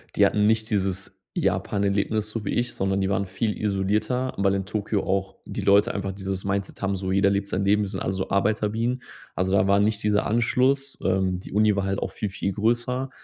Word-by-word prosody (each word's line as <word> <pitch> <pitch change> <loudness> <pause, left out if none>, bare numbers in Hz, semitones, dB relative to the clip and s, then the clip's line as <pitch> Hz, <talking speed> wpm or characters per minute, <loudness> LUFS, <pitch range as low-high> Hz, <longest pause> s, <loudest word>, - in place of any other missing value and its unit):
Die - - +5
hatten 105 0 +2
nicht 110 0 +2
dieses 95 -2 -2 0.2
Japan-Erlebnis, 100 +2 0
so 110 0 -4
wie - - -2
ich, 120 +1 0
sondern 95 0 0
die 95 0 0
waren 100 0 0
viel 105 +3 -2
isolierter, 105 +6 0
weil 100 0 +2
in 95 -1 -1
Tokio 105 0 -1
auch 95 0 -1
die - - -5
Leute 100 +4 +4
einfach 100 -1 -3
dieses 95 -1 -4
Mindset 100 0 -3
haben, 100 -1 0
so, 95 0 -3
jeder 100 0 +4
lebt 100 0 0
sein 95 - -1
Leben. 105 +2 +3
Wir - - -2
sind - - -5
alle 95 - -1
so 95 0 -3
Arbeiterbienen. 110 +5 0 0.3
Also, 95 +1 -1
da 95 -1 +4
war 100 +1 +4
nicht 105 +1 +1
dieser 105 -1 +2
Anschluss. 130 +5 +1
Ähm, 95 -1 +1
die 95 - -10
Uni 105 0 +4
war 100 -1 0
halt 100 0 -1
auch - - -3
viel, 105 - -3
viel 95 +1 -2
größer 120 +5 0
100 Hz, 220 wpm, -25 LUFS, 95-110 Hz, 0.3 s, Die